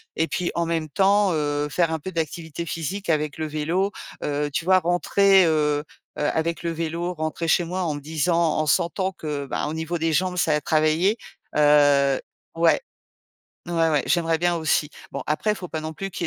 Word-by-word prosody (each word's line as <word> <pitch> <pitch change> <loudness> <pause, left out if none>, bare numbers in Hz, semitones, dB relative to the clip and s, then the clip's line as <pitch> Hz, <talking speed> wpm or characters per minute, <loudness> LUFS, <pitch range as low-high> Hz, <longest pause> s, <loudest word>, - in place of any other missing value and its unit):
et 160 - +1
puis 180 -1 -2
en 170 - 0
même 165 -2 -2
temps, 195 +3 +3
heu, 145 -1 -1
faire 165 +2 +1
un 160 - -2
peu 190 - -6
d'activité 165 0 -4
physique 170 +4 -4
avec 150 -2 0
le 160 - -2
vélo, 165 +6 -1 0.3
heu, 145 0 -1
tu 155 - -2
vois? 185 0 +5
Rentrer, 185 +2 +4
heu 150 -2 +1 0.3
heu, - - -2
avec 165 +1 -1
le 170 - -1
vélo, 170 +2 -3
rentrer 155 +1 -3
chez 175 +1 +3
moi 185 +2 -3
en 160 -3 -1
me 145 - -6
disant 160 +2 +1
en 155 - +1
sentant 180 +5 +1
que, 150 -5 -5
bah, 140 - -3
au 155 - -4
niveau 160 +1 -3
des 165 0 +1
jambes, 180 +3 0
ça 160 -3 +2
a 150 - +1
travaillé. 155 +8 +2 0.4
Heu 145 -2 +4 0.4
ouais. 165 - +3 0.9
Ouais, 175 - -3 0.2
ouais, 150 -4 +1
j'aimerais 165 -2 +1
bien 175 +1 +1
aussi. 160 -2 0 0.2
Bon, - - -5
après, 155 +8 0
il 210 - 0
faut 180 - -7
pas 160 -2 -5
non 155 0 -5
plus 195 +5 -6
qu'il - - -3
160 Hz, 205 wpm, -24 LUFS, 150-175 Hz, 0.9 s, vois